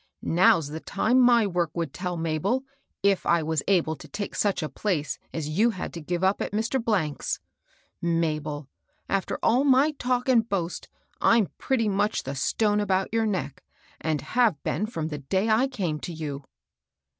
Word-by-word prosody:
" - - -56 0.2
Now's 165 -5 +5
the 155 +2 -5
time 220 +9 +1
my 240 -3 +5
work 175 -4 0
would 165 -5 -2
tell, 180 0 -3
Mabel, 165 - 0 0.4
if 200 -1 +3
I 170 -1 +2
was 160 -1 0
able 170 -5 +2
to - - -12
take 205 -1 -5
such 200 -5 0
a - - -1
place 155 +1 -2
as 160 -3 -3
you 200 +10 +3
had 200 -6 -5
to 170 - -6
give 175 +3 -3
up 190 +1 +2
at - - -3
Mr. 225 +5 0 0.4
's. - - -2 0.6
Mabel 155 -4 -1 0.4
I 195 - +2
after 195 - -4
all 245 +4 +4
my 280 +2 +4
talk 250 -3 -1
and 235 -3 +3
boast, 180 -3 -3 0.3
I'm 230 -4 +4
pretty 245 -5 +1
much 205 +1 0
the 135 - -4
stone 210 +9 +1
about 195 0 0
your 225 -1 +2
neck, 145 -10 -3 0.4
and 155 -2 -1
have 235 - +1
been 210 - -1
from 160 -8 -4
the 150 -2 -5
day 190 +10 0
I 225 +5 +4
came 180 - -3
to 175 - -6
you." 145 -3 -5
190 Hz, 185 wpm, -26 LUFS, 160-220 Hz, 0.6 s, Now's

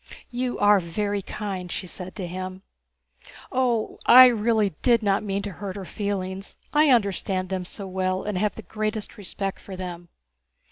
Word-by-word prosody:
"You 245 0 -2
are 205 0 +5
very 200 +4 -2
kind," 190 -3 -5
she - - -3
said 185 +1 -7
to 190 - -4
him. 185 +2 -6 0.9
"Oh, 245 -4 0
I 255 +1 +11
really 220 -4 +2
did 235 -3 +4
not 195 -1 +2
mean 200 -1 -2
to 205 - -4
hurt 190 +1 -6
her 195 -2 -6
feelings. 195 -1 -4 0.2
I 300 0 +5
understand 195 -5 +1
them 185 -1 -2
so 200 +2 -6
well 185 0 -1
and 210 -1 -3
have 205 +3 0
the 225 - -8
greatest 215 0 -3
respect 195 -2 -4
for 195 - -9
them." 175 -2 -7
200 Hz, 170 wpm, -25 LUFS, 185-215 Hz, 0.9 s, I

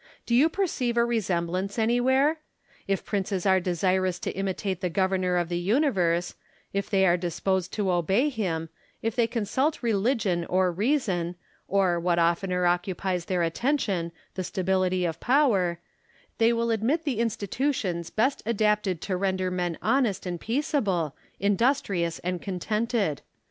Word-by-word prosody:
Do 235 - -2
you 275 +7 +5
perceive 290 -11 -1
a 235 - +4
resemblance 190 -3 -1
anywhere? 260 +7 +2 0.5
If 195 -1 -1
princes 195 -2 -2
are 190 -1 +5
desirous 185 +1 0
to - - -2
imitate 190 -1 -3
the 180 - 0
Governor 185 0 +1
of 175 -1 0
the 175 0 -2
universe; 180 - +1 0.4
if 200 0 -2
they 195 -2 +3
are 175 -1 +4
disposed 180 +1 -1
to 200 -3 0
obey 190 - +2
him; 175 - -2 0.3
if 225 -1 -1
they 235 -2 +3
consult 260 +6 -1
religion 210 -5 +1
or 185 0 +2
reason, 185 - 0 0.3
or, 190 -3 +2
what 175 0 +1
oftener 180 +2 +1
occupies 180 0 0
their 180 -2 0
attention, 190 - 0 0.2
the 185 - -3
stability 185 0 0
of 165 -1 -3
power, 220 - +2 0.3
— - - -33
they 230 +1 +5
will 235 0 0
admit 240 +9 +1
the 270 -8 -1
institutions 210 - -1
best 255 +6 +1
adapted 210 -5 +1
to 190 - -2
render 185 -1 0
men 175 -2 -2
honest 240 -9 +1
and 175 -2 -4
peaceable, 210 - 0 0.2
industrious 200 -5 +1
and 180 0 -2
contented. 210 - -1
190 Hz, 145 wpm, -26 LUFS, 180-230 Hz, 0.5 s, you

